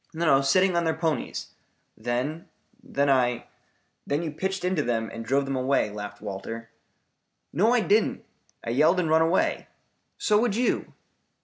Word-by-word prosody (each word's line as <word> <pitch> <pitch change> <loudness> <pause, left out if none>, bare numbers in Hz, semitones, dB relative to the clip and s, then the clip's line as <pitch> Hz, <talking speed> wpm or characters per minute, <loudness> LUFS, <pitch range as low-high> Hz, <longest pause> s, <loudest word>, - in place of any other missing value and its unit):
"No, 160 -5 +3
sitting 185 +7 +3
on 170 - +2
their 160 -1 0
ponies. 160 -5 -2 0.4
Then 130 +7 -3 0.3
then 230 - -1
I 125 -3 +2 0.3
" - - -42
"Then 145 +4 0
you 160 - -3
pitched 190 +4 -3
into 180 -4 +1
them 115 -4 -1
and 115 - -6
drove 135 +4 +1
them 135 0 -2
away," 130 -4 +1
laughed 105 0 -7
Walter. 110 +3 -6 0.8
"No, 205 +10 +3
I 245 - +3
didn't. 215 +1 +1 0.4
I 115 - -3
yelled 150 +8 +4
and 165 -3 0
run 160 0 +5
away. 165 +3 +1 0.5
So 210 -1 +2
would 235 -4 +1
you." 245 +2 0
150 Hz, 165 wpm, -26 LUFS, 120-180 Hz, 0.8 s, run